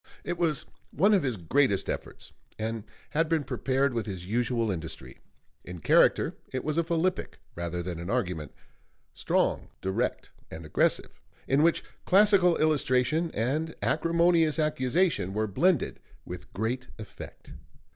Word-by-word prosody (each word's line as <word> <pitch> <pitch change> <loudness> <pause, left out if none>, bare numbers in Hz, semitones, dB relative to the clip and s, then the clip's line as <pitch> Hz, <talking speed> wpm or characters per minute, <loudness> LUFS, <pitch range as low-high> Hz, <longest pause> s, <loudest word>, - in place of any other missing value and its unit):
It 175 0 -3
was 160 -4 0 0.2
one 205 +3 +3
of 195 - +4
his 125 -6 -1
greatest 100 - +1
efforts, - - -6 0.2
and 110 0 -3 0.3
had 155 +2 +1
been 160 -3 +1
prepared 135 0 0
with 115 -3 -2
his 95 -4 -5
usual 115 +1 0
industry. 80 -3 -6 0.4
In 90 0 -8
character 80 - +4 0.2
it 130 - -3
was 155 +2 0
a - - +3
philippic 170 +2 -1 0.2
rather 85 0 -4
than 85 -2 -5
an 85 +2 -6
argument, 90 - -2 0.6
strong, - - 0
direct, 95 0 -2 0.2
and 80 0 -8
aggressive, 75 - 0 0.3
in 135 +2 +3
which 165 +1 +3 0.2
classical 195 -3 +5
illustration 155 +1 +2
and 150 +8 -1
acrimonious 165 -1 +3
accusation 150 - +1
were 110 0 +1
blended 160 - +1 0.3
with 90 0 -8
great 120 +5 -2
effect. 110 -3 -10
130 Hz, 135 wpm, -28 LUFS, 100-165 Hz, 0.6 s, classical